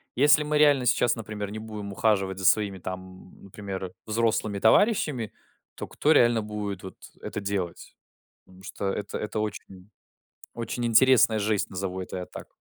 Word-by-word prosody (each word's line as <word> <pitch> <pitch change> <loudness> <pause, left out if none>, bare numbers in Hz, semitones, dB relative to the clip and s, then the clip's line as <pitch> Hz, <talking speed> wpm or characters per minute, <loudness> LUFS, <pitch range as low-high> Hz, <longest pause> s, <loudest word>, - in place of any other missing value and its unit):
если 150 +3 +5
мы 150 0 0
реально 145 -4 +4
сейчас, 120 0 +3
например, 105 -2 -6
не 110 - -6
будем 105 -2 -7
ухаживать 95 -3 +1
за 95 - -4
своими 100 0 +3
там, 95 +1 -8
например, 95 -2 -7
взрослыми 110 -2 0
товарищами, 130 - +2 0.4
то - - -6
кто 150 - +1
реально 120 -6 +4
будет 105 -3 -5
вот 95 - -9 0.3
это - - -5
делать? 100 -4 -4 0.5
Потому 95 0 -18
что 100 - -6
это 105 0 -4
это 105 0 -4
очень 100 -2 -6 0.6
очень 120 +1 -4
интересная 120 -1 +5
жесть, 105 -1 0
назову 95 0 -4
это 95 - -6
я 90 - -5
так. - - -10
105 Hz, 155 wpm, -26 LUFS, 95-115 Hz, 0.6 s, если